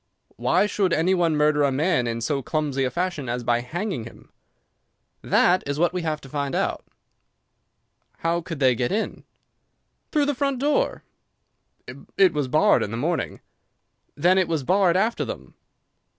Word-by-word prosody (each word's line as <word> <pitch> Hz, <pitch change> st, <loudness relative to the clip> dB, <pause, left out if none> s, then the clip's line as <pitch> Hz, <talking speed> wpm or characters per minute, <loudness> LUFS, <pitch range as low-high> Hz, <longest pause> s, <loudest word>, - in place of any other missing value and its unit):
"Why -, -, +2 dB
should 195 Hz, -4 st, 0 dB
any 175 Hz, +4 st, +2 dB
one 170 Hz, -4 st, +2 dB
murder 150 Hz, 0 st, +3 dB
a 140 Hz, -1 st, +3 dB
man 145 Hz, -2 st, +1 dB
in 115 Hz, 0 st, -3 dB
so 135 Hz, +4 st, -1 dB
clumsy 145 Hz, -1 st, -1 dB
a -, -, 0 dB
fashion 175 Hz, -5 st, -3 dB
as 120 Hz, +1 st, -3 dB
by 120 Hz, 0 st, +1 dB
hanging 170 Hz, -, -4 dB
him?" 115 Hz, -, -14 dB, 0.9 s
"That 180 Hz, +1 st, +3 dB
is 140 Hz, 0 st, -2 dB
what 175 Hz, +2 st, +2 dB
we 180 Hz, -, -2 dB
have 155 Hz, -2 st, -2 dB
to -, -, -12 dB
find 140 Hz, 0 st, -3 dB
out." -, -, -1 dB, 1.3 s
"How 170 Hz, +1 st, -1 dB
could 165 Hz, -3 st, -7 dB
they 130 Hz, -2 st, +4 dB
get 120 Hz, +1 st, -2 dB
in?" 215 Hz, +3 st, -3 dB, 0.9 s
"Through 300 Hz, -2 st, +2 dB
the 290 Hz, -, 0 dB
front 275 Hz, 0 st, -1 dB
door." 295 Hz, -, 0 dB, 1.1 s
"It 190 Hz, -2 st, +5 dB
was 145 Hz, -3 st, -1 dB
barred 155 Hz, +10 st, +3 dB
in -, -, -2 dB
the 115 Hz, -, -4 dB
morning." 160 Hz, +7 st, -2 dB, 0.7 s
"Then 180 Hz, +5 st, +3 dB
it 185 Hz, -, +1 dB
was 160 Hz, -4 st, -1 dB
barred 185 Hz, +3 st, +3 dB
after 220 Hz, +4 st, 0 dB
them." -, -, -8 dB
160 Hz, 165 wpm, -24 LUFS, 135-185 Hz, 1.3 s, It